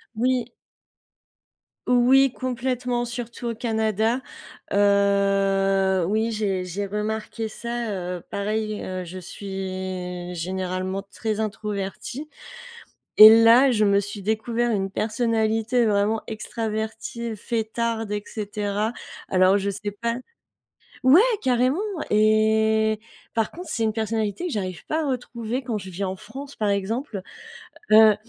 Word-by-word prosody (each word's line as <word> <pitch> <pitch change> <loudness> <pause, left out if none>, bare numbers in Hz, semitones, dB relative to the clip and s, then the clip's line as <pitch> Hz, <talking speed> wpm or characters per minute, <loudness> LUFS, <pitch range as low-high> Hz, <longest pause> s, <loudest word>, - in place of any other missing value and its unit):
Oui. 250 +1 +1 1.4
Oui 250 +2 +5
complètement, 250 -1 -2
surtout 240 0 -5
au 230 - -3
Canada. 220 +1 0 0.5
Heu, 195 -2 +3
oui 220 +3 +1
j'ai 200 -4 -1
j'ai 185 +3 -4
remarqué 215 +2 -3
ça, 235 0 -4
heu, 180 -2 -4
pareil, 215 +1 -2
heu, 185 -1 -4
je 180 +2 -8
suis 185 -1 -5
généralement 185 +2 -3
très 215 +1 -3
introvertie 215 +6 -4 0.9
et 220 +1 +10
là, 245 +4 +7
je 215 -2 +3
me 200 0 +4
suis 205 0 -4
découvert 230 +3 0
une 195 -3 -1
personnalité 225 +1 +1
vraiment 210 +1 +1
extravertie, 220 +1 -4
fêtarde 225 0 -2
et 205 - -2
cetera. 210 0 -2 0.4
Alors 185 +1 +4
je 200 0 -2
sais 205 +1 -4
pas 230 +3 -2 0.9
ouais, 285 +10 +8 0.2
carrément 255 +3 +2 0.3
et 220 0 +3 0.4
par 225 -1 0
contre, 355 0 -9
c'est 225 - 0
une 220 - +1
personnalité 220 - -2
que - - -5
j'arrive 185 -6 -4
pas 315 +1 0
à - - -1
retrouver 245 0 -3
quand 235 -3 -2
je 190 -1 -8
vis 185 +3 -6
en 190 -1 -2
France 265 +8 -10
par 210 -2 0
exemple, 200 +2 -2 0.7
heu, 215 -1 +8
215 Hz, 125 wpm, -24 LUFS, 200-235 Hz, 1.4 s, et